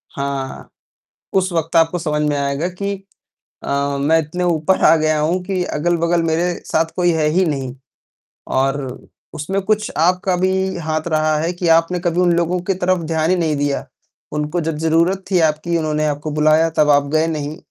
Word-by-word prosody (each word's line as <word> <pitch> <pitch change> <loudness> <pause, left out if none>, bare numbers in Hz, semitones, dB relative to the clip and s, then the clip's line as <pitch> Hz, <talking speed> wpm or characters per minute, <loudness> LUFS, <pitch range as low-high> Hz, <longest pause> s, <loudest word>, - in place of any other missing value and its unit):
हाँ। 140 -1 -4 0.7
उस 190 0 0
वक़्त 165 0 -1
आपको 165 +2 +3
समझ 150 -2 -1
में 145 - 0
आएगा 140 +4 -1
कि 200 +3 -4 0.7
अ, 140 0 -1
मैं 155 +4 +3
इतने 180 +4 -4
ऊपर 170 +1 +1
आ 165 - +7
गया 155 -1 +1
हूँ 165 +5 0
कि 185 -1 -1
अगल-बगल 170 +1 +1
मेरे 170 +2 0
साथ 160 +1 +1
कोई 175 -1 +2
है 160 -2 +1
ही 185 +4 +2
नहीं। 135 -5 -3 0.8
और 135 +1 +2 0.6
उसमें 190 +7 -2
कुछ 215 +2 0
आपका 180 +3 +2
भी 185 +1 +1 0.3
हाथ 155 +1 -2
रहा 155 -1 +1
है 165 +3 -1
कि 175 -1 -3
आपने 165 +2 +1
कभी 175 0 -1
उन 175 -1 +3
लोगों 175 +1 0
की 195 - +4
तरफ 185 0 0
ध्यान 160 +1 +1
ही 185 - +3
नहीं 160 -4 0
दिया। 145 -1 -1 0.5
उनको 150 +3 -2
जब 160 -1 -3
ज़रूरत 165 +4 +1
थी 180 - +3
आपकी, 160 +1 +1
उन्होंने 155 -1 -1
आपको 150 +1 -3
बुलाया, 155 +2 +3
तब 155 -2 +2
आप 145 -1 +4
गए 160 +1 +3
नहीं। 155 0 -4
160 Hz, 185 wpm, -19 LUFS, 150-175 Hz, 0.8 s, आ